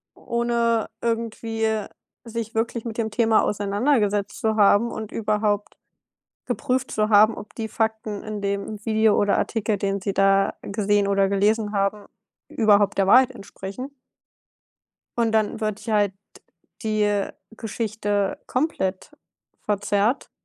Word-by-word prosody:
ohne 235 -1 0
irgendwie 225 -2 -1 0.4
sich 230 -1 -5
wirklich 230 +1 -1
mit 225 -1 -5
dem 220 -2 -1
Thema 225 0 +3
auseinandergesetzt 205 0 0
zu 220 -1 +1
haben 210 +2 +4
und 220 -1 -6
überhaupt 210 -1 -1 0.7
geprüft 260 -1 -1
zu 215 0 0
haben, 215 +1 +6
ob 210 - -10
die 225 - -3
Fakten 220 -2 -2
in 215 -1 -5
dem 200 +1 -3
Video 220 -1 +3
oder 205 -1 +2
Artikel, 215 -2 0
den 200 0 -2
sie 200 +1 -2
da 195 0 +3
gesehen 205 0 +1
oder 195 -1 +2
gelesen 210 +2 +1
haben, 200 +1 0 0.4
überhaupt 205 -3 +3
der 195 -1 +2
Wahrheit 255 +5 +6
entsprechen 200 +7 -8 1.3
und 230 -1 +2
dann 220 0 +1
wird 215 -1 -2
ja 220 -2 0
halt 205 -2 +2 0.7
die, 215 -1 +1
äh, 205 -1 0 0.2
Geschichte 210 -3 -2
komplett 225 -9 -2 0.5
verzerrt 205 +4 0
215 Hz, 130 wpm, -23 LUFS, 205-225 Hz, 1.3 s, haben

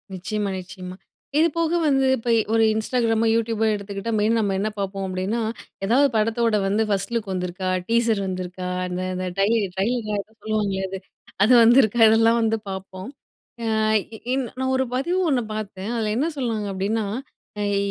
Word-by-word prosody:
நிச்சயமா, 205 +2 -3
நிச்சயமா. 185 0 -9 0.4
இதுபோக 330 +1 +2 0.2
வந்து 270 -2 +3
இப்ப 235 +1 -4 0.2
ஒரு 225 0 +4
Instagramமோ 225 0 +1
YouTubeபோ 225 -1 0
எடுத்துக்கிட்டா 200 +2 -5
மெயினா 220 +2 +2
நம்ம 205 -3 0
என்ன 210 +2 0
பாப்போம். 195 0 -3
அப்படின்னா, 190 +5 -2 0.4
எதாவது 260 +7 +4
படத்தோட 225 +1 +2
வந்து 210 +3 +2
ஃபர்ஸ்ட் 195 +1 -1
லுக் 215 -4 -2
வந்துருக்கா? 185 +1 -3 0.2
டீசர் 230 -2 +2
வந்துருக்கா? 185 0 -4 0.2
அந்த, 180 0 -3
இந்த 185 0 -3
டையு 210 +4 +3 0.2
ட்ரெய்லரோ 215 +2 -1
ஏதோ 210 - -21
சொல்லுவாங்களே, 210 -3 -1
அது. 190 0 -5 0.4
அது 230 +5 +5
வந்துருக்கா 235 -1 +5
இதெல்லாம் 225 +1 +4
வந்து 225 0 +1
பாப்போம். 190 +2 -7 0.6
ஆ - - -1 0.5
இ - - -8 0.2
இன் 265 -1 0
நான் 260 0 0
ஒரு 260 - +2
பதிவு 345 +8 0
ஒண்ணு 265 -4 +2
பாத்தேன். 205 -1 -5
அதுல 220 -2 -1
என்ன 290 +6 +1
சொல்றாங்க 225 -5 -2
அப்டின்னா, 205 +3 -1 0.7
யி 200 - +1
215 Hz, 155 wpm, -23 LUFS, 195-230 Hz, 0.7 s, அது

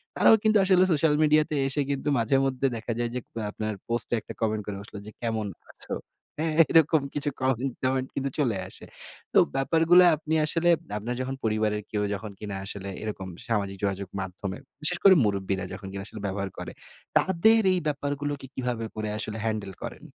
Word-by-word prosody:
তারাও 225 - +7
কিন্তু 215 -1 +4
আসলে 185 -1 +5
সোশ্যাল 155 -1 +3
মিডিয়াতে 155 0 +3
এসে 140 +2 +1
কিন্তু 140 +1 -3
মাঝেমধ্যে 135 +3 +2
দেখা 115 +1 -4
যায় 120 -1 0
যে, 125 - 0
কো - - -11
আপনার 110 0 -3
পোস্টে 120 0 0
একটা - - -9
কমেন্ট 110 -1 0
করে 105 - -4
বসলো 100 0 -10
যে, 110 - -8
"কেমন 110 -3 -1 0.2
আছো?" - - -7 0.5
হ্যাঁ? 160 0 0 0.2
এরকম 160 -1 +5
কিছু 145 0 0
কমেন্ট-টমেন্ট 130 0 0
কিন্তু 140 0 -1
চলে 120 -9 +1
আসে। - - -10 0.5
তো - - +4 0.2
ব্যাপারগুলো 165 +5 +5
আপনি 155 +1 -4
আসলে 170 +3 +2 0.3
আপনার 120 +4 -3
যখন 130 +1 -3
পরিবারের 110 -1 +1
কেউ 105 -1 0
যখন 105 +1 -5
কিনা 105 -2 -5
আসলে 100 -1 -4
এরকম 105 -3 -5 0.2
সামাজিক 100 -4 -1
যোগাযোগ 100 -1 -1
মাধ্যমে 95 +1 -5 0.2
বিশেষ 175 +3 +1
করে 195 - +9
মুরুব্বিরা 100 -2 -1
যখন 95 0 -8
কিনা 95 0 -5
আসলে 110 - -8
ব্যবহার 100 0 -3
করে, - - -6 0.5
তাদের 220 +5 +4
এই 180 - +1
ব্যাপারগুলোকে 145 -1 -2
কিভাবে 125 -3 -2
করে 110 -1 -3
আসলে 110 0 -4
হ্যান্ডেল 105 -3 -2
করেন? - - -7
120 Hz, 175 wpm, -27 LUFS, 105-150 Hz, 0.5 s, করে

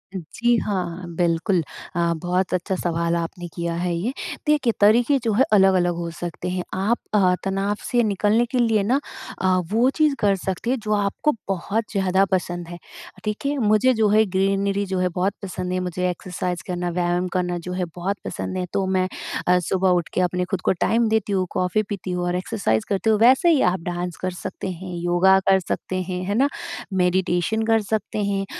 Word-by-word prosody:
जी, 235 +8 0
हाँ। 185 -4 -2
बिल्कुल 175 +2 +1 0.3
अ, 170 -1 +2
बहुत 180 +1 0
अच्छा 185 +2 -1
सवाल 170 -1 -1
आपने 170 +1 -4
किया 170 -1 -2
है 175 +1 -1
ये, 190 +9 -1 0.4
देखिए 290 -6 +3
तरीके 235 +7 +5
जो 230 - +1
है 240 +6 +4
अलग-अलग 190 -3 +4
हो 170 0 -4
सकते 175 +1 -4
हैं। 180 0 -2
आप 200 +5 +1 0.2
अ, 190 -3 +4
तनाव 195 +1 -1
से 240 -1 +1
निकलने 210 +2 +2
के 255 - 0
लिए 225 -4 +3
ना 250 +7 +2 0.4
अ, 190 - +2 0.2
वो 235 +4 +4
चीज़ 305 -3 +3
कर 200 -1 +3
सकती 190 +4 -3
हैं 260 - +2
जो 215 -1 -2
आपको 205 +8 +1 0.2
बहुत 195 +4 -1
ज़्यादा 190 -2 +2
पसंद 175 -2 -1
हैं। 175 0 -8 0.5
ठीक 210 +4 -3
है? 285 +1 0
मुझे 225 +2 +3
जो 220 -2 +2
है 215 +1 +5
ग्रीनरी 195 +1 +1
जो 190 -1 -2
है 180 0 +1
बहुत 190 +2 +1
पसंद 185 -1 -4
है 185 - 0
मुझे 180 0 -1
एक्सरसाइज़ 180 0 -4
करना, 180 -1 -2
व्यायाम 175 +1 0
करना 180 -1 0
जो 180 - -3
है 180 0 -1
बहुत 190 +3 -2
पसंद 185 - -4
है। 180 - -1
तो 195 - +1
मैं 185 -1 +1 0.4
अ, 180 0 +5
सुबह 185 +2 +1
उठ 175 -2 +1
के - - +1
अपने 180 0 0
खुद 190 - -1
को - - +2
टाइम 230 0 +3
देती 220 -2 0
हूँ, 185 -1 +1
कॉफ़ी 185 +3 0
पीती 195 -3 -4
हूँ, 180 0 -1
और 175 0 0
एक्सरसाइज़ 180 - -1
करती 200 +2 0
हूँ। 215 -1 +3
वैसे 260 +9 +5
ही 315 -5 +4
आप 185 - -3
डांस 175 0 -3
कर 185 - -1
सकते 185 - -4
हैं, 180 +1 -7
योगा 175 +2 +4
कर 190 0 +6
सकते 185 +1 -4
हैं, 180 0 -4
है 200 +2 -1
ना? 270 +5 +4 0.5
मेडिटेशन 180 +2 +1
कर 225 0 +3
सकते 210 0 -2
हैं। 200 -1 -1
190 Hz, 200 wpm, -23 LUFS, 180-210 Hz, 0.5 s, कर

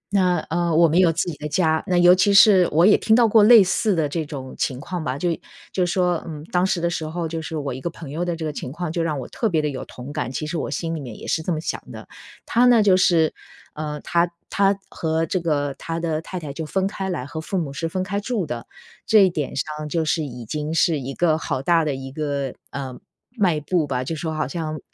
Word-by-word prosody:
那， 180 -2 +3
呃， 170 -1 +1
我 165 0 +6
们 165 +4 +2
有 175 -3 +5
自 165 - 0
己 - - -8
的 150 0 -5
家， 160 -2 +1
那 180 -1 +2
尤 175 +1 +7
其 190 +2 +3
是 195 -4 +7
我 165 +4 +4
也 210 - +7
听 220 - +3
到 235 -2 +5
过 220 0 +5
类 225 -2 +9
似 195 +1 +1
的 155 -3 +1
这 160 +2 -2
种 140 -4 -7
情 130 -1 -1
况 175 +1 -5
吧。 130 0 -2
就 175 +3 0 0.4
就 180 -2 0
说， 180 -1 0
嗯， 150 -2 -7
当 180 0 +2
时 190 -2 +1
的 170 - 0
时 170 -2 -2
候， 165 +1 -3
就 165 0 -4
是 160 0 -5
我 140 -3 -3
一 130 - -7
个 170 - -2
朋 160 -4 -10
友 165 +4 -2
的 175 -1 -1
这 160 -1 -5
个 150 - -3
情 130 - -6
况 170 +1 -4
就 170 - -1
让 155 -3 -1
我 125 - -6
特 225 - -1
别 160 -3 +1
的 150 -1 0
有 130 - -5
同 130 +4 -9
感， 145 -4 -3
其 155 - -4
实 165 +3 -4
我 150 - -2
心 165 +3 -3
里 160 - -3
面 120 -6 -8
也 - - -10
是 160 - 0
这 175 - -3
么 155 - -1
想 - - -4
的。 - - -10 0.4
他 240 +2 +3
呢， 235 -3 +6
就 190 -3 +5
是， 165 -3 +3 0.4
呃， 150 -1 -5
他 170 +1 +1 0.2
他 195 0 +2
和 160 0 -1
这 185 - -1
个 145 -4 -1
他 165 0 -4
的 160 -2 -1
太 185 +2 -6
太 150 -4 -7
就 160 +3 -5
分 190 +5 -1
开 195 -1 -3
来 150 -8 -3
和 160 +2 -6
父 190 +4 -3
母 145 -5 -2
是 165 +3 -3
分 185 +2 -2
开 200 +2 -2
住 210 -4 -2
的， 120 -4 -6 0.4
这 210 -3 +6
一 185 - +1
点 150 -5 -3
上 150 +1 -4
就 160 0 0
是 160 +1 +1
已 125 -4 -7
经 150 +5 -4
是 160 -4 +3
一 135 +1 -6
个 160 -3 +2
好 135 -5 -3
大 170 0 +3
的 145 -3 -1
一 135 0 -7
个， 140 -3 -3 0.2
呃， 130 -2 -6 0.4
迈 180 -8 +2
步 155 0 0
吧， 130 -1 -1
就 160 +5 -4
说 160 +1 -3
好 155 -4 -2
像 155 0 -4
160 Hz, 285 characters per minute, -22 LUFS, 150-180 Hz, 0.4 s, 类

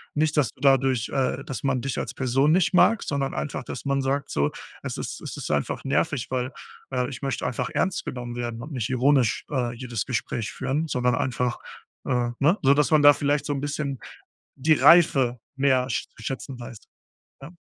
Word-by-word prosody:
Nicht, 155 0 +1
dass 145 -6 +3
du - - -25
dadurch, 135 -3 +3
äh 135 0 -1
dass 135 - -5
man 135 -2 +1
dich 135 0 -3
als - - -4
Person 135 +3 +2
nicht 180 +2 +3
mag, 220 +5 +4
sondern 140 -1 -2
einfach, 140 -3 -3
dass - - -7
man 140 0 +1
sagt: 135 +1 -1
„So, 70 +1 +1 0.3
es - - -4
ist - - -5
es - - -7
ist - - -4
einfach - - -1
nervig, 135 -1 0
weil 130 0 -1 0.4
äh 125 -1 -1
ich 135 - -8
möchte 135 -1 -2
einfach 125 0 -2
ernst 190 -1 0
genommen 120 -1 -5
werden 120 -1 -4
und 150 - -9
nicht 125 -5 -3
ironisch, 130 -2 +2
äh, 125 -4 -1
jedes 120 -3 -4
Gespräch 115 -3 -2
führen, 150 +5 -2
sondern 125 -4 +1
einfach, 125 -2 -1 0.5
äh 120 -1 +1
ne?" 160 +8 +3
So, 135 +1 +6
dass 150 0 +2
man 155 -2 +5
da 145 0 +9
vielleicht 145 0 0
so 145 - -1
'n 140 - -3
bisschen 140 -2 -3 0.6
die 150 +4 +3
Reife 135 -7 +5 0.2
mehr 130 -2 +2
sch - - -2
zu - - -12
schätzen 135 -1 -5
weiß. 120 -2 -9 0.6
Ja? 140 - -9
135 Hz, 200 wpm, -25 LUFS, 125-145 Hz, 0.6 s, da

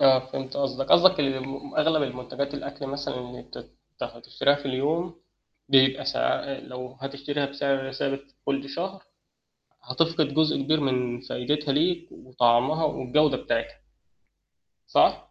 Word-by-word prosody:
آه، 135 -1 +7
فهمت 135 -1 -5
قصدك. 135 -1 -1
قصدك 185 0 +7
إن 135 -2 0
م 135 +1 -8
أغلب 155 0 +3
المنتجات 140 +2 -4
الأكل 140 0 -6
مثلًا 140 +1 -4
اللي 125 0 -8
تت - - -10 0.3
هتشتريها 140 - 0
في 145 0 -7
اليوم، 160 +6 -1 0.5
بيبقى 135 0 +5
سعر 135 - -1
لو 125 +1 -8
هتشتريها 140 +1 -3
بسعر 140 -1 -1
ثابت 135 +1 -2 0.2
كل 140 0 -1
شهر، 185 +6 -5 0.8
هتفقد 155 +3 +1
جزء 155 +1 +3
كبير 155 +3 +2
من 125 -3 -1
فايدتها 145 +4 -1
ليك 170 +4 +1
وطعمها 130 +5 +2
والجودة 145 0 +2
بتاعتها. - - -2 1.1
صح؟ - - +3
140 Hz, 130 wpm, -26 LUFS, 130-150 Hz, 1.1 s, آه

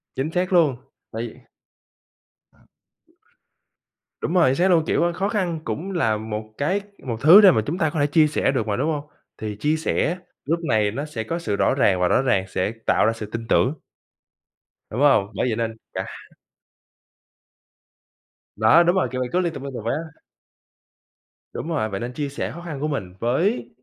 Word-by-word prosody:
Chính 140 +5 -2
xác 185 +1 -1
luôn, 155 -7 +4 0.4
tại 115 +1 -4
vì - - -13 2.8
Đúng 165 - -2
rồi, 175 -7 +5
chính 130 - +1
xác 180 +6 +2
luôn, 165 -3 +4
kiểu, 175 0 +2
khó 195 +3 -1
khăn 180 -6 -1
cũng 190 +5 -4
là 110 - +1
một 110 0 -6
cái 185 +8 0 0.2
một 115 -3 -3
thứ 175 +8 +9
để 195 - +8
mà 110 - +2
chúng 165 +8 -2
ta 160 -4 +1
có 155 - -3
thể 145 - +3
chia 155 +1 +4
sẻ 150 - +1
được 120 -5 -1
mà, 105 - 0
đúng 150 +6 0
hông? 145 -2 -3 0.3
Thì 105 -1 -5
chia 150 +2 +1
sẻ 160 +2 0 0.3
lúc 165 +4 0
này 105 -2 +2
nó 140 +6 -4
sẽ 120 -8 -5
có 170 +6 -3
sự 105 -11 -2
rõ 100 - +2
ràng 100 -8 +3
và 90 - +4
rõ - - +3
ràng 120 -8 +1
sẽ 95 +2 -1
tạo - - +3
ra 115 - +2
sự 110 -2 -6
tin 115 +2 -6
tưởng. 125 +4 +3 1.2
Đúng 120 - -3
không? 135 -9 +4
Bởi 115 - 0
vậy 110 - 0
nên 115 0 -3 0.2
cả - - -3 0.2
h - - -25 2.2
Đó, 110 +11 +5
đúng 175 +2 +2
rồi, 185 - +2
kiểu 130 0 -3
vậy, 125 - -2
cứ 180 - +3
liên 170 -3 -1
tục, 135 - -7
liên 140 -1 -6
tục 115 - -6
vậy 115 - 0
á. 160 -1 -7 1.3
Đúng - - -5
rồi, 145 -10 -1
vậy 95 -1 -4
nên 120 +3 -5
chia 145 +2 -3
sẻ 140 - -4
khó 170 - -9
khăn 160 -5 -6
của 150 - -1
mình 110 -12 -4
với 125 - 0
140 Hz, 205 wpm, -23 LUFS, 115-165 Hz, 2.8 s, thứ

